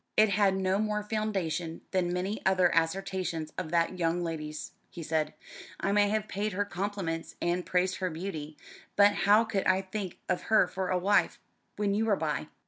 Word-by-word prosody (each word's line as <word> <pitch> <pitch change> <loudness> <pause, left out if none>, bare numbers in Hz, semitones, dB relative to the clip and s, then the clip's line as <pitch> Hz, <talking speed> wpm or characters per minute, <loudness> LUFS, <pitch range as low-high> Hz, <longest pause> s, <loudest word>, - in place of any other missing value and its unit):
"It 215 0 +6
had 200 -1 +3
no 190 +1 +1
more 210 -1 0
foundation 190 -6 -2
than 180 -2 +1
many 185 +4 -2
other 185 -2 +4
assertions 165 -1 -1
of 185 -4 -4
that 170 +2 +1
young 170 +1 +1
lady's," 155 -2 -5 0.2
he 170 - -8
said. 155 0 -1 0.4
"I 195 - 0
may 205 0 +4
have 215 0 -1
paid 205 +1 -2
her 205 +2 0
compliments, 190 -4 -3
and 175 +1 0
praised 185 +1 +1
her 185 -1 -1
beauty; 155 -3 -6 0.4
but 200 0 +7
how 205 +3 +5
could 205 -3 -1
I 190 +1 +3
think 190 -1 -5
of 180 - -1
her 220 -4 +6
for 190 0 -3
a 185 - +2
wife, 200 +3 +2 0.4
when 205 -1 0
you 215 +2 +1
were 215 -3 +3
by? 155 -3 -2
185 Hz, 185 wpm, -29 LUFS, 170-205 Hz, 0.4 s, but